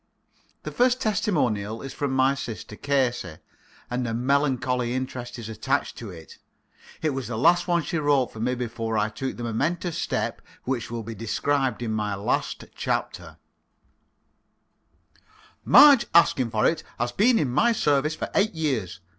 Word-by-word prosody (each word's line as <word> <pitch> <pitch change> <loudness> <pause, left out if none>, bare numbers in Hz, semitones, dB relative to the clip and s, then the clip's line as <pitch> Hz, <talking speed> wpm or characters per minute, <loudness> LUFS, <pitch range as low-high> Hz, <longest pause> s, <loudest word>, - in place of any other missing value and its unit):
The - - -5
first 250 +1 +2
testimonial 130 - -1
is 135 0 -7
from 145 0 -2
my 130 +1 +3
sister 115 -5 -7
Casey, 120 - -1 0.5
and 125 0 -2
a 115 - -2
melancholy 130 -1 0
interest 125 -1 -5
is 115 -3 -7
attached 115 +6 -2
to 115 - -7
it. 80 -4 -12 0.6
It 155 - +2
was 135 -4 -4
the 115 -2 -4
last 175 +8 +4
one 170 -2 +2
she 165 +3 -2
wrote 145 -4 +1
for 110 - -9
me 125 +3 0
before 115 -2 -3
I 105 +1 +1
took 130 +5 -5
the 120 - -6
momentous 160 +9 -2
step - - -2 0.2
which 125 -2 -3
will 115 -1 -4
be 115 +2 -6
described 125 +3 -1
in 115 - -2
my 105 -2 -1
last 100 +5 -2
chapter: - - -3 2.3
"Marge 285 -5 +7
Askinforit 130 -1 +3 0.2
has 120 +1 -1
been 225 - +3
in 140 - 0
my 230 - +3
service 150 -7 +1
for - - -5
eight 205 +2 +2
years. 120 - -2
130 Hz, 155 wpm, -25 LUFS, 115-150 Hz, 2.3 s, Marge